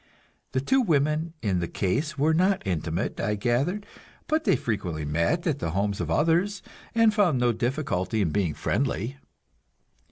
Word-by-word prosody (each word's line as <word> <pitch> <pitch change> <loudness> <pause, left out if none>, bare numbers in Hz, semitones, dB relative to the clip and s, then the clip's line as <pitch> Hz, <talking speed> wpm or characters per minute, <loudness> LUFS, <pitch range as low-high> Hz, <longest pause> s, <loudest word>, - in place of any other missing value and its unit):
The 130 - +2
two 265 - +3
women 155 - +1
in 95 -4 +1
the 85 - -2
case 140 - -1
were 155 +3 +3
not 185 - +2
intimate, 85 -1 -2
I 105 +1 0
gathered, 135 - 0 0.4
but 310 0 0
they - - +4
frequently 90 -9 -3
met 85 - 0
at 150 -5 0
the 85 - -2
homes 100 +1 0
of - - -3
others, 175 +6 +1 0.3
and 225 -2 +5
found 195 -10 +3
no 120 -1 +3
difficulty 115 -4 -1
in 90 -7 +1
being 85 -4 0
friendly. 130 -1 -1
135 Hz, 160 wpm, -26 LUFS, -, 0.4 s, and